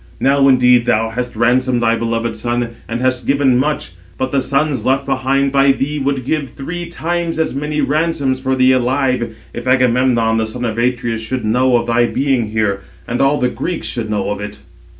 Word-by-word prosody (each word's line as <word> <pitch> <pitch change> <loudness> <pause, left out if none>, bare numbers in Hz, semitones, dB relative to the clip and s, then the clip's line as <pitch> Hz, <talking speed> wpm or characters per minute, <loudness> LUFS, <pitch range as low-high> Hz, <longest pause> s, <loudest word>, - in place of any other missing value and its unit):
Now 135 0 +3
indeed 125 -2 +4
thou 115 -1 +2
hast 125 +1 -4
ransomed 125 +2 +2
thy 115 0 +3
beloved 115 0 -2
son, 120 +1 -2 0.2
and 115 +1 -3
hast 130 -1 0
given 140 -2 +3
much; 140 -6 -1 0.3
but 130 0 -2
the 140 - +1
sons 140 +1 0
left 135 +1 +1
behind 135 +1 0
by 135 0 +4
thee 145 +2 -2
would 135 -2 -1
give 145 -2 -1
three 170 +7 -6
times 170 0 -2
as 160 - 0
many 150 +2 -2
ransoms 155 -5 0
for 130 0 -1
thee 130 0 +4
alive, 130 -2 0 0.2
if 120 +1 -6
Agamemnon, 125 -2 +2
the 110 0 0
son 120 +3 -5
of 115 -1 -2
Atreus, 120 -2 -1
should 125 +2 -3
know 125 +3 +3
of 120 - -2
thy 120 0 +2
being 130 -4 0
here, 105 -2 -1 0.3
and 120 +2 -1
all 135 +2 +3
the 125 -2 +1
Greeks 140 +9 -4
should 115 -4 -3
know 100 -1 -1
of 105 - -4
it." 105 0 -7
130 Hz, 195 wpm, -17 LUFS, 115-135 Hz, 0.3 s, indeed